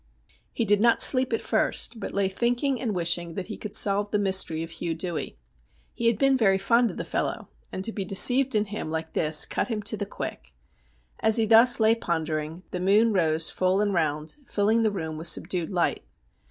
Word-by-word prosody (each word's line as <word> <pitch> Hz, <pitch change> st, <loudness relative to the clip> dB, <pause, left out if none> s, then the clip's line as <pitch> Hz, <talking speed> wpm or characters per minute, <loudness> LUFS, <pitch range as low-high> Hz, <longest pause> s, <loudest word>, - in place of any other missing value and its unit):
He 230 Hz, -, -2 dB
did 205 Hz, -1 st, +2 dB
not 235 Hz, 0 st, +3 dB
sleep 255 Hz, -1 st, +5 dB
at 225 Hz, -, -2 dB
first, 230 Hz, -, -1 dB
but -, -, -6 dB
lay 200 Hz, -1 st, 0 dB
thinking 245 Hz, +6 st, -1 dB
and 220 Hz, -6 st, -3 dB
wishing 170 Hz, -1 st, -1 dB
that 190 Hz, -, -5 dB
he -, -, -8 dB
could 210 Hz, -, -7 dB
solve 205 Hz, 0 st, +2 dB
the 210 Hz, -, 0 dB
mystery 190 Hz, -5 st, +1 dB
of 165 Hz, -, -9 dB
Hugh 170 Hz, -1 st, -5 dB
Dewey. 170 Hz, -, -5 dB, 0.6 s
He 235 Hz, -, -2 dB
had 230 Hz, -2 st, +1 dB
been 275 Hz, +3 st, +2 dB
very 195 Hz, -6 st, +2 dB
fond 230 Hz, +5 st, +1 dB
of -, -, -9 dB
the -, -, -5 dB
fellow, -, -, -4 dB, 0.2 s
and 190 Hz, -, -5 dB
to 225 Hz, -, -2 dB
be 200 Hz, -, -5 dB
deceived 250 Hz, +7 st, +4 dB
in 210 Hz, 0 st, +1 dB
him 205 Hz, -5 st, -6 dB
like 160 Hz, 0 st, -5 dB
this 155 Hz, -1 st, +3 dB
cut -, -, -3 dB
him 220 Hz, -4 st, -4 dB
to 205 Hz, +2 st, -2 dB
the 205 Hz, -, -5 dB
quick. 65 Hz, -, -8 dB, 0.6 s
As 220 Hz, -1 st, +2 dB
he 225 Hz, -, +2 dB
thus 230 Hz, +3 st, +6 dB
lay 220 Hz, 0 st, +4 dB
pondering, 160 Hz, -4 st, -4 dB
the 180 Hz, -, -4 dB
moon 210 Hz, +5 st, +2 dB
rose 160 Hz, -3 st, +1 dB
full 185 Hz, +1 st, 0 dB
and 205 Hz, -1 st, 0 dB
round, 155 Hz, -, -2 dB
filling 215 Hz, +2 st, 0 dB
the 220 Hz, -, +2 dB
room 160 Hz, -5 st, -6 dB
with 165 Hz, -, +1 dB
subdued 175 Hz, +1 st, 0 dB
light. 180 Hz, -3 st, -1 dB
200 Hz, 210 wpm, -25 LUFS, 170-225 Hz, 0.6 s, thus